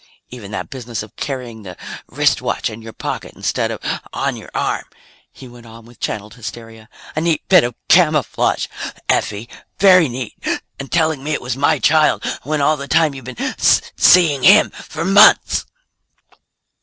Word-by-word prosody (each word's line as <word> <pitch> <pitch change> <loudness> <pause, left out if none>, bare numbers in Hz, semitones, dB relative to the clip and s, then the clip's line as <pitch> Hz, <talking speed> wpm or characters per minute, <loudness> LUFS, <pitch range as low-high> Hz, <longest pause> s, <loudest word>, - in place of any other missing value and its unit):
"Even 120 -6 -9
that 105 - -6
business 120 -4 -6
of 110 - -15
carrying 125 -5 -6
the 90 -3 -10 0.3
wristwatch - - 0
in 110 +1 -10
your 115 0 -9
pocket - - -6
instead - - -1
of - - -5 0.3
on - - -2
your - - -11
arm," - - -1 0.5
he 130 - -13
went 120 -1 -15
on 115 0 -14
with 120 0 -18
channeled 105 0 -4
hysteria. 115 -1 -10 0.3
"A 155 - -1
neat 165 -2 -1
bit 180 -3 +6
of 120 -1 -3
camouflage, 155 -5 +2 0.4
Effie. 105 +2 -1 0.3
Very 185 -5 +5
neat. 125 -1 -6 0.4
And 140 - -8
telling 160 -4 +1
me 155 +1 -2
it - - -1
was 125 0 -3
my 145 +3 +2
child, 155 +2 +2 0.2
when 150 0 -2
all 155 +2 +2
the 140 0 -7
while 155 -1 +3
you've 135 -3 -10
been 130 -2 -4 0.4
seeing 160 -7 +5
him 200 +9 +6
for 160 +2 -7
months!" 200 +2 +5
130 Hz, 165 wpm, -18 LUFS, 115-155 Hz, 0.5 s, bit